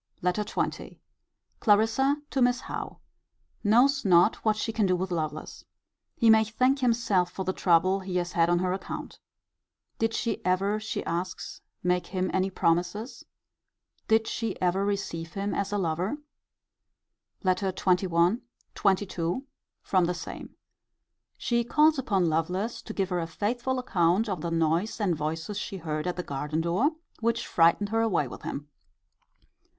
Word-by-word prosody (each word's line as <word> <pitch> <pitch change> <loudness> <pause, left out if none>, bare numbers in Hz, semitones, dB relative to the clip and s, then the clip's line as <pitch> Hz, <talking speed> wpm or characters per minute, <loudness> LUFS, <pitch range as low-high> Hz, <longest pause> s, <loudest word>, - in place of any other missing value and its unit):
LETTER 180 +4 +1
XX. 210 - -3 0.6
Clarissa 225 +7 +3
to 270 - 0
Miss 245 +1 +3
Howe. - - -6 0.7
Knows 250 +6 +4
not 180 +1 +5
what 215 -1 +1
she 225 +1 -2
can 215 -3 +2
do 185 - +3
with 185 +1 -3
Lovelace. 155 -2 -4 0.5
He 230 - +2
may 220 0 +7
thank 255 +5 +1
himself 230 -8 +2
for 190 +1 -5
the 185 - 0
trouble 185 +2 +3
he 190 -1 -5
has 175 0 0
had 170 0 +2
on 175 - +3
her 180 +1 0
account. 190 - -6 0.8
Did 225 0 +1
she 225 -1 -2
ever, 195 +3 +1
she 215 - -4
asks, 175 +2 -4 0.2
make 180 0 +1
him 185 -1 -2
any 190 +1 +1
promises? 180 +6 -1 0.8
Did 220 0 +3
she 225 -3 -3
ever 185 +2 +1
receive 185 -5 -3
him 200 0 -2
as 200 0 -2
a 205 - 0
lover? 180 - -1 1.3
LETTER 190 +1 +1
XXI. 180 +2 +2 0.3
XXII. 190 +1 0 0.4
From 185 -2 +2
the 175 +1 -1
same. 170 - -8 0.8
She 235 -1 0
calls 300 +5 +4
upon 195 -9 +1
Lovelace 180 +8 -1
to 220 - -8
give 195 -3 -1
her 180 -2 0
a 165 - -2
faithful 240 +9 -2
account 190 -4 +2
of 190 -6 -3
the 170 - -2
noise 165 +6 0
and 190 -5 +1
voices 160 +6 -3
she 195 - -5
heard 155 -1 -3
at 180 - -1
the 180 - -4
garden 150 +2 -3
door, 180 - +1 0.3
which 235 +1 0
frightened 170 +5 +3
her 225 +1 +1
away 190 -11 +1
with - - -9
him. 145 +1 -5
190 Hz, 155 wpm, -27 LUFS, 175-220 Hz, 1.3 s, may